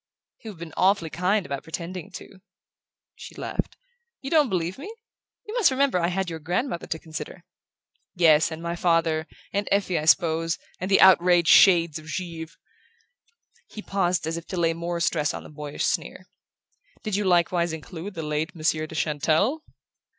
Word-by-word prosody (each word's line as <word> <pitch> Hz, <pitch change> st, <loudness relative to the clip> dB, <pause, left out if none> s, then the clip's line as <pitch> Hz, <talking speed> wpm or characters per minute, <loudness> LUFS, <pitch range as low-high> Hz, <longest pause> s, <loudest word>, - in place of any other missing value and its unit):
"You've 215 Hz, -5 st, -8 dB
been 165 Hz, -2 st, -9 dB
awfully 185 Hz, -2 st, +2 dB
kind 185 Hz, +3 st, 0 dB
about 140 Hz, -1 st, -4 dB
pretending 170 Hz, +2 st, -6 dB
to." 195 Hz, -, -11 dB, 0.7 s
She -, -, -12 dB
laughed. -, -, -4 dB, 0.4 s
"You 270 Hz, -, -7 dB
don't 305 Hz, -5 st, +4 dB
believe 180 Hz, +2 st, -2 dB
me? 390 Hz, +10 st, -7 dB, 0.5 s
You 425 Hz, -, -7 dB
must 470 Hz, -7 st, +4 dB
remember 265 Hz, -6 st, +1 dB
I 170 Hz, -, +1 dB
had 185 Hz, +1 st, -2 dB
your 165 Hz, -1 st, -5 dB
grandmother 175 Hz, -, -2 dB
to 160 Hz, -, -3 dB
consider." 160 Hz, -1 st, -8 dB, 0.7 s
"Yes: 165 Hz, -2 st, +5 dB
and 160 Hz, 0 st, -7 dB
my 170 Hz, 0 st, -3 dB
father 165 Hz, -2 st, +1 dB, 0.3 s
and 200 Hz, +1 st, -1 dB
Effie, 190 Hz, -4 st, +1 dB
I 150 Hz, -, -4 dB
suppose 165 Hz, 0 st, +3 dB, 0.2 s
and 185 Hz, -, -4 dB
the 195 Hz, -, +4 dB
outraged 175 Hz, -2 st, +6 dB
shades 170 Hz, -5 st, +5 dB
of 155 Hz, -, -14 dB
Givre!" 165 Hz, -1 st, -6 dB, 1.1 s
He 215 Hz, -, -10 dB
paused, 185 Hz, -2 st, 0 dB
as 165 Hz, +1 st, -2 dB
if 170 Hz, -, -9 dB
to 185 Hz, -, -5 dB
lay 165 Hz, -1 st, +2 dB
more 170 Hz, +1 st, -4 dB
stress 150 Hz, -3 st, 0 dB
on -, -, -7 dB
the -, -, -12 dB
boyish 150 Hz, -1 st, -4 dB
sneer: -, -, -2 dB, 0.8 s
"Do 215 Hz, -, -4 dB
you 205 Hz, +1 st, 0 dB
likewise 175 Hz, -2 st, +2 dB
include 165 Hz, +4 st, -8 dB
the 165 Hz, -, -4 dB
late 150 Hz, +4 st, -3 dB
Monsieur 155 Hz, -1 st, 0 dB
de 160 Hz, -, -10 dB
Chantelle?" 155 Hz, -, +1 dB
170 Hz, 170 wpm, -25 LUFS, 160-190 Hz, 1.1 s, outraged